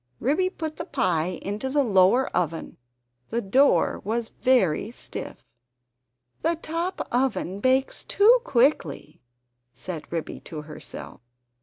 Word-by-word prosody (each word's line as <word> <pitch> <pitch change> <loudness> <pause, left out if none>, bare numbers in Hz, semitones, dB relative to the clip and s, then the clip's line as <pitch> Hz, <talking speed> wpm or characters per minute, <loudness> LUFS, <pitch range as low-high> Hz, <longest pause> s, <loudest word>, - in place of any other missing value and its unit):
Ribby 310 +9 +1
put 315 -4 -6
the 335 - -5
pie 180 - 0
into 205 +7 -3
the 285 +1 +2
lower 205 +3 +4
oven; 165 -2 -2 0.5
the 230 - -1
door 255 +7 +3
was 225 +2 -2
very 220 -9 +3
stiff. 240 - -7 1.0
"The 335 - +1
top 335 +3 -3
oven 245 -7 0
bakes 260 +4 +1
too 460 +5 +5
quickly," 235 - +1 0.5
said 170 -4 -7
Ribby 165 -2 -4
to 155 -2 -8
herself. 155 -7 -9
235 Hz, 120 wpm, -25 LUFS, 180-285 Hz, 1.0 s, too